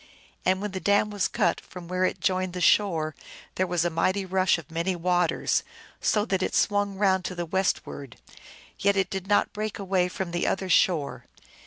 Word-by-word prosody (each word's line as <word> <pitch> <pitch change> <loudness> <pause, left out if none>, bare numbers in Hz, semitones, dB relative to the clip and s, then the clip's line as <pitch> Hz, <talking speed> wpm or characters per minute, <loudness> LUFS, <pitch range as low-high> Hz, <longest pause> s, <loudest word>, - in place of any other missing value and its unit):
And 190 +2 +2
when 210 - -3
the 190 - -4
dam 205 +2 +2
was 205 -2 0
cut - - 0
from 180 -2 -11
where 185 +1 -1
it - - -2
joined 185 -1 0
the 180 - -4
shore 165 -5 +3 0.4
there 185 - 0
was 175 -1 0
a 175 - 0
mighty 185 +4 0
rush 185 -1 +2
of 165 -2 -11
many 170 +3 -1
waters, 175 -1 +1 0.4
so 210 -1 +1
that 190 -4 -1
it - - -1
swung 205 -1 +1
round 190 -2 +2
to 180 - -4
the 175 -1 -3
westward, 160 - -2 0.6
yet 200 0 +2
it 195 - +1
did 190 -1 -4
not 205 - +2
break 215 0 -3
away 190 -2 +1
from 180 -1 -5
the 175 - -1
other 190 -1 -1
shore. 165 -4 +2
185 Hz, 195 wpm, -26 LUFS, 175-195 Hz, 0.6 s, shore